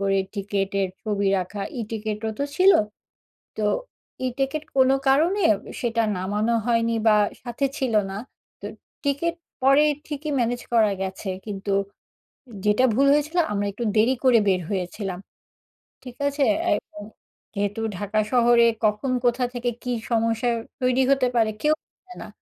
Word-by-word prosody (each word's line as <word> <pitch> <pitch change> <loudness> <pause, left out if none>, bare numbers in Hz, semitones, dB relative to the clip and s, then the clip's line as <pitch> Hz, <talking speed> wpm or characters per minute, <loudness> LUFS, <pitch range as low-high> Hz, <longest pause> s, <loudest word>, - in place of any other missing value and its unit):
করে 195 0 +1 0.2
টিকেটের 195 -1 -1
ছবি 205 -2 -1
রাখা। 185 +3 -5 0.2
ই-টিকেটও 220 0 -3
তো 280 - 0
ছিলো, 380 +1 +6 0.8
তো 215 - -2 0.6
ই-টিকেট 270 +4 -2
কোনো 265 0 +5
কারণে 330 +9 +3 0.4
সেটা 230 -1 +1
নামানো 210 +5 0
হয়নি 230 -1 +1
বা, 215 - +6 0.3
সাথে 240 +3 -2
ছিলো 230 -5 +2
না। 195 - -5 0.4
তো - - -9 0.4
টিকেট 310 +5 0 0.3
পরে 275 +3 +6 0.2
ঠিকই 300 0 -4
ম্যানেজ 240 0 0
করা 215 -3 +4
গেছে 190 +1 -4 0.2
কিন্তু 200 -1 -4 0.9
যেটা 210 +5 +4
ভুল 275 +5 +3
হয়েছিল 300 +4 0
আমরা 205 -1 -1
একটু 215 +4 -5
দেরি 230 +5 +4
করে 250 -3 +6
বের 185 -2 +2
হয়েছিলাম। 190 0 -3 0.8
ঠিক 250 -2 -10
আছে? 285 0 0 0.3
এখন 205 0 -6 0.5
যেহেতু 205 +1 -2 0.2
ঢাকা 205 +3 -1
শহরে 240 -1 +5 0.2
কখন 215 +5 0
কোথা 245 +1 +2
থেকে 245 0 -2
কী 250 - -2 0.2
সমস্যার 230 +1 +1 0.3
তৈরি 255 +1 +3
হতে 270 -2 +3
পারে 225 -2 +3
কেউ 300 +1 +3 0.2
জানে 365 -1 -16
না। - - -8
230 Hz, 140 wpm, -24 LUFS, 205-265 Hz, 0.9 s, ছিলো